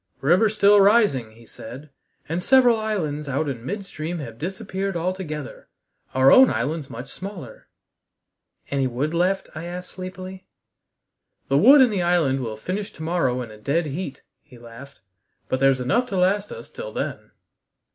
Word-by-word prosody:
"River 180 +10 +4
still 205 -1 +5
rising," 195 - +3
he 115 +1 -17
said, 130 +8 -11 0.4
"and 165 +3 -2
several 245 +1 +5
islands 155 -10 -3
out 140 +3 -1
in 125 -5 -5
midstream 175 - -5
have 115 -7 -8
disappeared 190 +1 -4
altogether. 165 -5 -5 0.5
Our 130 +1 +6
own 260 0 +8
island's 140 +5 -2
much 125 +2 -8
smaller." 185 - -9 1.0
"Any 135 -2 +1
wood 135 +6 -2
left?" 185 +3 0
I 155 +2 -7
asked 180 +1 -7
sleepily. 185 0 -8 1.0
"The 135 - +3
wood 270 - +8
and 245 -4 +4
the 190 - 0
island 170 -6 +2
will 115 -4 -5
finish 195 - -4
to 160 - -9
morrow 145 -7 0
in 115 - -10
a 105 - -13
dead 150 +9 0
heat," 150 0 -6 0.2
he 140 -5 -17
laughed, 120 +4 -13 0.5
"but 130 - 0
there's 135 -1 +3
enough 135 - +1
to 195 - -3
last 195 +3 +1
us - - -9
till - - -7
then." - - -5
165 Hz, 160 wpm, -23 LUFS, 135-195 Hz, 1.0 s, own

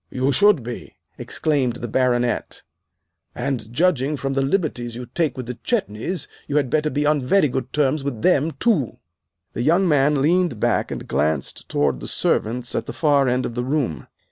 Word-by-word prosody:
"You 130 +2 0
should 200 - +4
be!" 120 +1 -7 0.2
exclaimed 135 -6 0
the 120 - -5
Baronet; 125 0 0 0.7
"and, 125 -4 -3
judging 150 -1 +1
from 135 0 -2
the 135 - +1
liberties 135 - -1
you 125 +1 -6
take 150 0 -1
with 130 - -4
the 120 -1 -7
Chetneys, 180 - -2 0.2
you 145 - 0
had 135 -4 +1
better 155 0 +2
be 145 0 -1
on 150 -1 +2
very 150 +6 +3
good 130 -1 -4
terms 145 0 +1
with 130 -6 -4
them, 160 -4 +3
too." 190 - 0 0.6
The - - -3
young 170 +8 +3
man 145 -2 +3
leaned 170 - +2
back - - +1
and - - -6
glanced 75 -2 -1
toward 70 -4 +1
the - - -7
servants 120 +2 -1
at - - -2
the - - -5
far 145 -4 +3
end 125 +1 +1
of - - -4
the 120 +1 -2
room. 130 - -2
135 Hz, 185 wpm, -22 LUFS, 120-155 Hz, 0.7 s, should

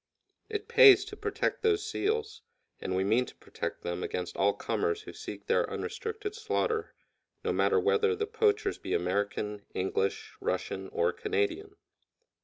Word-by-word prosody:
It 425 -2 -3
pays 405 -5 +8
to 415 0 -8
protect 425 +1 -1
those 430 -2 +2
seals, 440 +1 -1 0.4
and 95 - -2
we 95 - +2
mean 115 +6 +2
to - - -12
protect - - -6
them 85 +1 -3
against 90 -1 -3
all 100 +1 +3
comers 435 0 -1
who - - -9
seek - - -8
their - - +2
unrestricted 435 -3 -4
slaughter, 445 0 -1 0.5
no - - 0
matter 450 - +3
whether 440 0 +3
the 430 0 -1
poachers 430 -2 +1
be - - -2
American, 100 +3 -1
English, 95 - -1
Russian, 465 +5 -2
or 465 +1 +1
Canadian. 415 -3 -1
425 Hz, 150 wpm, -30 LUFS, -, 0.5 s, pays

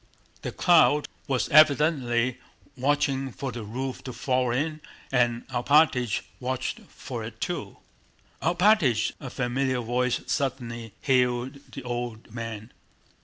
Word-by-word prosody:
The - - -4
crowd 160 -4 +4 0.2
was 135 -3 0
evidently 140 -5 +4 0.4
watching 135 0 0
for 135 +2 -5
the 120 -1 -6
roof 125 +5 -5
to 130 - -5
fall 125 +1 0
in, 155 +5 -1 0.3
and 120 -2 +1
Alpátych 125 -3 +3 0.2
watched 130 0 -3
for - - -7
it - - -8
too. - - -4 0.6
"Alpátych!" 170 - +3
a 135 - -7
familiar 130 +1 -1
voice 120 +1 0
suddenly 120 -5 -3
hailed 125 -1 +1
the 135 - -7
old 120 -3 -5
man. 115 -1 -6
125 Hz, 120 wpm, -26 LUFS, 120-140 Hz, 0.6 s, crowd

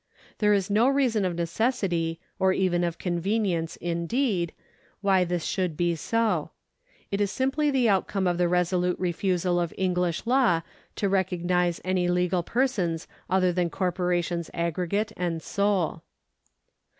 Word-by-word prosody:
There 210 -1 +3
is 195 -2 +2
no 215 +4 +3
reason 250 -7 +2
of 180 -2 -1
necessity 170 -2 -1 0.2
or 190 0 +3
even 180 -2 +1
of 170 -1 -1
convenience, 180 -1 -1
indeed, 175 - -1 0.5
why 195 -2 +3
this 175 -1 -2
should 180 -6 -1
be 175 -1 +1
so. 225 +7 0 0.6
It 200 +1 0
is 200 - +2
simply 270 +7 0
the 260 -4 +2
outcome 195 -1 +1
of 175 -1 +1
the 175 - +3
resolute 180 0 +1
refusal 180 0 0
of 170 -2 -2
Enghsh 180 -2 0
law 240 -9 +3 0.3
to 200 - 0
recognise 180 -2 +1
any 185 -1 +1
legal 180 0 +1
persons 185 -7 -1 0.2
other 185 -1 +3
than 175 -1 0
corporations 175 -2 -1
aggregate 180 +5 -1
and 170 -2 -1
sole. 195 -3 0
180 Hz, 140 wpm, -26 LUFS, 175-200 Hz, 0.6 s, There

